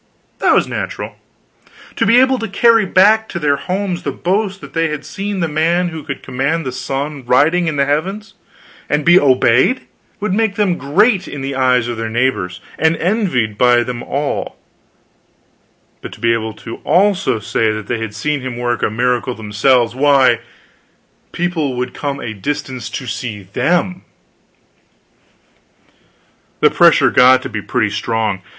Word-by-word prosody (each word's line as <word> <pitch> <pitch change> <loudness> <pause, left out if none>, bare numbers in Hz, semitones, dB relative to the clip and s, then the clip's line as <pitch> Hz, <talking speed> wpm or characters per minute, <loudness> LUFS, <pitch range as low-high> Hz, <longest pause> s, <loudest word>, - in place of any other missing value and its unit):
That - - +3
was - - +2
natural. - - -5 0.8
To 230 - +1
be 230 +3 +5
able 260 0 +3
to 225 - -3
carry 225 +1 +3
back 215 +5 +4
to - - -5
their 145 -3 +2
far - - -10
homes 185 -1 -2
the - - -3
boast 195 +1 -1
that - - -11
they 165 0 +1
had 150 -1 -5
seen 195 +5 -4
the 170 - +1
man 165 +3 +1
who 160 -2 -7
could 140 -3 -7
command 135 +5 -2
the 130 - -3
sun, 135 +2 -4
riding 150 +8 +2
in 160 - -1
the 140 -1 +2
heavens, 190 +10 -2 0.6
and 150 0 0
be 175 +2 +7
obeyed, 130 - +3 0.4
would 210 -2 -2
make 220 -1 0
them 195 -5 0
great 190 - +2
in 145 - -7
the 135 +1 -3
eyes 125 -2 +2
of 120 -1 -4
their 115 0 -3
neighbors, 115 -7 -1 0.2
and 160 +1 +2
envied 165 - -1
by 120 -1 +4
them 120 -1 -5
all; 140 +3 -3 1.4
but - - -8
to - - -14
be 115 0 +2
able 110 -1 -3
to 115 - -9
also 195 - +1
say 110 +1 -1
they 110 +2 -4
had 110 -2 -5
seen 145 +5 -2
him 125 -2 -5
work 120 -1 -2
a - - +1
miracle 125 +2 -1
themselves 115 +3 +1
why, 140 0 +4 0.9
people 165 -6 -2
would 125 0 -3
come 140 -1 -4
a 110 - -5
distance 130 +3 -4
to 135 - -6
see 115 -4 -5
them. 175 - -1 2.6
The - - +4
pressure - - +5
got 130 +1 +5
to - - -5
be 110 -1 -4
pretty 110 -1 -1
strong. 105 -2 -2
140 Hz, 165 wpm, -16 LUFS, 120-180 Hz, 2.6 s, be